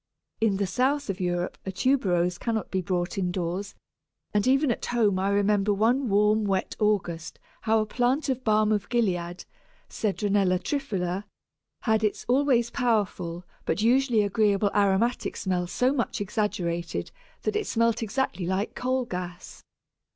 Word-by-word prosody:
In 215 -3 +2
the 200 - 0
south 255 +5 0
of 190 - -8
Europe 175 -1 -2
a 190 - -4
Tuberose 185 -6 +1
cannot 225 -2 -2
be 190 - 0
brought 180 +1 -2
indoors, 180 +2 -2 0.6
and 210 +2 +2
even 270 +1 +3
at - - -3
home 215 -6 +2
I 195 +1 +1
remember 205 0 +2
one 240 +5 +2
warm 210 +2 +3
wet 195 -2 -1
August 180 -6 -1 0.2
how 225 0 +2
a - - -1
plant 250 +7 0
of 260 -1 -1
Balm 215 -1 +3
of 210 -2 0
Gilead 180 -7 -1 0.4
(Cedronella 200 -3 +1
triphylla) 195 -6 -2 0.6
had 220 -2 +1
its 210 - -1
always 250 -2 +2
powerful 200 -8 -1 0.2
but 210 - -1
usually 245 -2 +3
agreeably 205 0 +2
aromatic 205 +4 +1
smell 180 -2 -1
so 250 +8 +1
much 240 -5 -1
exaggerated 180 -5 -2 0.3
that 430 - -1
it 425 -1 -1
smelt 230 0 +1
exactly 220 -6 -2
like 190 +3 -1
coal 255 0 -1
gas! 180 -3 -7
210 Hz, 145 wpm, -26 LUFS, 185-235 Hz, 0.6 s, even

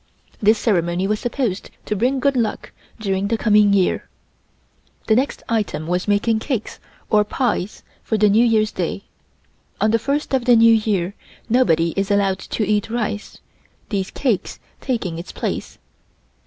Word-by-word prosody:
This 215 +1 +4
ceremony 180 -4 0
was 210 +1 0
supposed 240 -6 -2 0.2
to 210 - -2
bring 250 +6 +1
good 280 +1 +1
luck 230 -4 -2 0.3
during 195 -2 -1
the 225 +2 0
coming 210 -2 +4
year. 195 -2 +1 1.0
The 220 - +3
next 260 +4 -1
item 215 -8 -1
was 180 +4 -1
making 220 +2 +2
cakes 235 -2 -4 0.3
or 210 -1 +5
pies 210 -3 -2 0.2
for 220 - -1
New 210 +2 +4
Year's 220 -2 +2
day. 185 +2 -3 0.8
On 215 - +2
the 230 - +2
first 280 +5 -2
of 260 -3 +1
the 245 -1 +6
New 230 0 +6
Year, 200 -4 0 0.4
nobody 170 -9 +3
is 195 +1 -1
allowed 200 -2 +2
to 215 - -3
eat 210 0 0
rice, 215 -3 -3 0.5
these 195 -3 -2
cakes 240 -9 -1 0.2
taking 200 -11 -3
its 175 - -8
place. - - -4
215 Hz, 155 wpm, -20 LUFS, 195-230 Hz, 1.0 s, the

